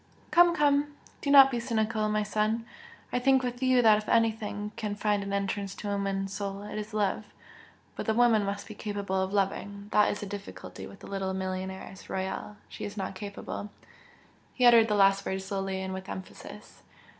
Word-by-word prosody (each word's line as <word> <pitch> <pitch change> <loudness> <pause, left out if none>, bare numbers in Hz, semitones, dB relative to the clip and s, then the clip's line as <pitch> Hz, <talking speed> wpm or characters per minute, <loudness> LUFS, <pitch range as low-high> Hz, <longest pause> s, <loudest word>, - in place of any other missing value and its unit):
"Come, 345 0 +6
come! 290 -2 +2 0.3
Do 285 - -2
not 275 -1 +9
be 240 - -1
cynical, 220 -2 0
my 210 0 +1
son! 215 +2 0 0.5
I 250 - +2
think 265 +1 +3
with 245 0 -4
you 255 -1 +4
that 215 -2 +6
if 215 - -8
anything 215 -2 +1
can 210 -2 -3
find 210 -1 0
an 200 0 -5
entrance 200 0 -2
to 205 - -5
a - - -1
woman's 195 -1 -2
soul 200 -1 -4
it 210 +1 -5
is 210 +1 -6
love 210 0 0 0.7
but - - -5
the 220 - +2
woman 230 -3 +4
must 200 0 -3
be 215 - -8
capable 200 -2 -2
of 190 0 -2
loving. 200 0 -2
That 210 - +4
is 205 - -3
the - - -4
difficulty 200 0 -8
with 200 - -14
the - - -10
little 195 -1 -3
millionairess 190 0 -5
Royal. 190 +2 -4
She - - -9
is 205 0 -6
not 195 -1 -3
capable!" 200 +1 -6 0.9
He 250 - +3
uttered 230 -2 +7
the 210 - +1
last 195 0 +4
words 190 0 -3
slowly 195 -1 -3
and 190 0 -4
with 190 0 -7
emphasis. 190 - -9
205 Hz, 195 wpm, -29 LUFS, 195-225 Hz, 0.9 s, not